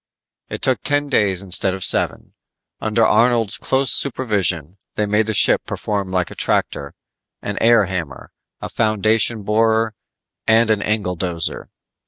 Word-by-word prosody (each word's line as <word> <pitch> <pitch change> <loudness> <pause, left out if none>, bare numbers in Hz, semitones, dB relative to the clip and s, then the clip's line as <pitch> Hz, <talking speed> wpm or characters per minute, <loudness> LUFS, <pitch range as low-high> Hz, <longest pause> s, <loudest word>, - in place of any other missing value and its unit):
It - - -7
took 130 -2 +1
ten 145 0 -1
days 100 -7 +1
instead 95 0 -1
of 95 - -6
seven. - - +1 0.5
Under 110 +1 +1
Arnold's 115 -4 +2
close 135 0 +1
supervision, 100 - +1 0.2
they 105 - 0
made 105 +1 0
the 110 - -1
ship - - +4
perform 100 -3 -3
like 90 -2 -1
a - - -10
tractor, 70 0 -1 0.5
an 105 - -4
air 115 -2 +4
hammer, 85 -8 -6 0.3
a - - -5
foundation 110 0 0
borer 110 +1 +1 0.5
and 110 0 +4
an 105 -2 +1
angledozer. 90 -5 -3
105 Hz, 140 wpm, -19 LUFS, 95-115 Hz, 0.5 s, ship